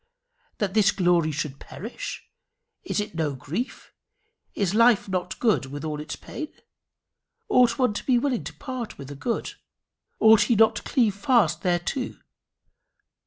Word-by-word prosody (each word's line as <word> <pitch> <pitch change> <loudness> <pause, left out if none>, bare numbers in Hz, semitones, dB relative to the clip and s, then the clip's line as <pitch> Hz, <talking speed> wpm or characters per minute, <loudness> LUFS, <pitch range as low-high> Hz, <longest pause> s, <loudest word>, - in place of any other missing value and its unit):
That 200 -3 -1
this 215 -1 +4
glory 175 -5 +2
should 145 -2 -4
perish 240 - -7 0.6
is 345 - -2
it 210 -3 -3
no 155 -4 -1
grief? 170 - -5 0.6
Is 195 -2 0
life 230 -1 +4
not 185 -2 -2
a - - -26
good 215 - +2
with 145 +3 -6
all 150 -1 -3
its 155 +1 -6
pain? 310 - -7 1.0
Ought 245 0 +4
one 250 -5 +2
to - - -4
be 255 -2 +3
willing 250 -1 0
to - - -6
part 255 -4 -6
with 140 0 -9
a - - -7
good? 230 - -3 0.7
Ought 220 -1 +7
he 235 - +3
not 225 +1 +4
to - - -4
cleave 230 -6 +1
fast 205 - +2
thereto? 180 +8 -1
205 Hz, 160 wpm, -25 LUFS, 165-240 Hz, 1.0 s, Ought